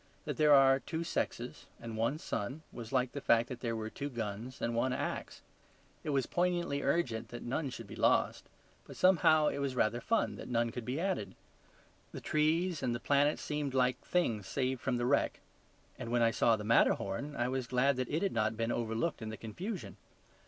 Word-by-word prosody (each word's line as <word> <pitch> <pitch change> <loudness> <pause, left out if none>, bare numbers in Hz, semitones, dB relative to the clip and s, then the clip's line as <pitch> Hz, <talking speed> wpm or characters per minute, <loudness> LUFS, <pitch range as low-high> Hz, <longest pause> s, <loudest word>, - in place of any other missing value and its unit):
That - - -3
there 150 -2 +6
are 135 -1 +6
two 160 +4 -4
sexes - - -3
and 115 -1 -6
one 115 +7 0
sun, 130 +1 -4
was 115 -2 -8
like 130 -2 +1
the 140 - -5
fact 115 -2 +3
that 125 - -6
there 115 -2 -2
were 110 0 -4
two 145 0 -4
guns 115 0 -5
and 115 - -1
one 125 +2 +1
axe. - - -4 0.6
It - - -4
was 135 -3 +1
poignantly 175 -5 0
urgent 135 -7 0
that 120 - -7
none 135 +4 -2
should 115 -2 -8
be 100 - -10
lost; - - +2 0.4
but - - -10
somehow, 155 -4 +5
it - - -4
was 140 -2 -1
rather 120 0 +1
fun 230 - 0
that - - -8
none 115 -1 +1
could 120 0 -6
be 130 +4 -2
added. 185 - -2 0.8
The - - -5
trees 160 +3 +1
and 120 -1 0
the - - -4
planets 145 +3 +2
seemed 145 -3 -2
like 125 -1 +2
things 115 - 0
saved 130 +3 -1
from 130 -2 0
the 120 - -1
wreck: 140 +3 +1 0.6
and 120 -3 -5
when 120 -1 +3
I 115 - +4
saw 115 +1 +3
the 105 - -6
Matterhorn 115 +4 +2
I 120 - 0
was 130 -1 -2
glad 130 +3 +2
that 130 -2 -2
it 155 +5 0
had 195 - 0
not 110 -1 0
been 115 0 0
overlooked 115 +6 -1
in 110 - -4
the 110 - -6
confusion. 180 - -6
130 Hz, 205 wpm, -33 LUFS, 115-150 Hz, 0.8 s, there